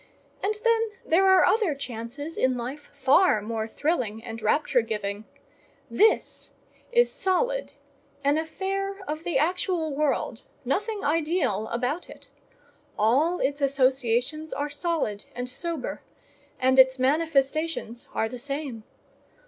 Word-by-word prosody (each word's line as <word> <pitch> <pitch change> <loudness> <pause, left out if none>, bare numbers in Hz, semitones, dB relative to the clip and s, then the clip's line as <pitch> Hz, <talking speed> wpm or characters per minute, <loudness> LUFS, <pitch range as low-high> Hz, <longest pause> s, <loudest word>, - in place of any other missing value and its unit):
And 420 +2 0
then 455 -1 +3 0.2
there 380 +4 +4
are 380 -1 +6
other 420 -9 +2
chances 270 +4 -6
in 260 -1 +1
life 260 +5 -6
far 275 - +4
more 220 +1 -3
thrilling 230 -5 -1
and 225 -1 -7
rapture 250 +3 +2
giving: 210 -2 -4 0.7
this 440 +2 +2 0.4
is 480 0 +4
solid, - - 0 0.5
an 285 +2 +3
affair 390 +5 -3
of 310 +2 -4
the 340 -5 0
actual 325 0 0
world, 275 -5 -1 0.2
nothing 415 - -1
ideal 300 - +1
about 250 +9 -2
it: - - -13 0.7
all 280 +12 +3
its 285 +2 0
associations 265 +2 +1
are 290 +1 -3
solid 290 - -2
and 245 +1 -3
sober, 305 +2 -4 0.6
and 260 +1 +4
its 260 0 +7
manifestations 285 -2 0
are 220 - +1
the 250 +2 -7
same. 275 -3 -4
285 Hz, 125 wpm, -26 LUFS, 245-340 Hz, 0.7 s, its